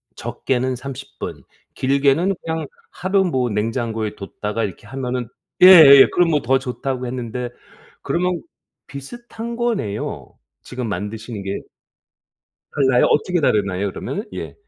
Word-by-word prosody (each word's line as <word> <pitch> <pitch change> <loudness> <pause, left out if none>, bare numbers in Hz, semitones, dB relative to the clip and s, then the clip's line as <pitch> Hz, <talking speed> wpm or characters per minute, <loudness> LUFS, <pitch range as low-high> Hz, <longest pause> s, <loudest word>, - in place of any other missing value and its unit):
적게는 130 0 -2
30 135 +1 -9
분, - - -6 0.3
길게는 140 +8 +2
그냥 160 -2 -3 0.2
하루 190 +2 +1
뭐 130 -8 0
냉장고에 110 0 -2
뒀다가 105 +2 -4
이렇게 100 +2 -9
하면은 125 -2 -3 0.3
예예. 160 -7 +10
그럼 175 -2 +3
뭐 150 - +2
더 135 +3 +2
좋다고 130 0 -4
했는데 125 0 -4 0.5
그러면 180 0 -1 0.5
비슷한 230 - -8
거네요, 215 - -3 0.3
지금 125 -2 -5
만드시는 105 +2 -5
게. 95 0 -3 1.1
달라요? 130 -4 +3
어떻게 175 +3 +1
다르나요, 100 -5 +1
그러면은? 205 - -5
예. - - -6
130 Hz, 280 characters per minute, -20 LUFS, 115-160 Hz, 1.1 s, 예예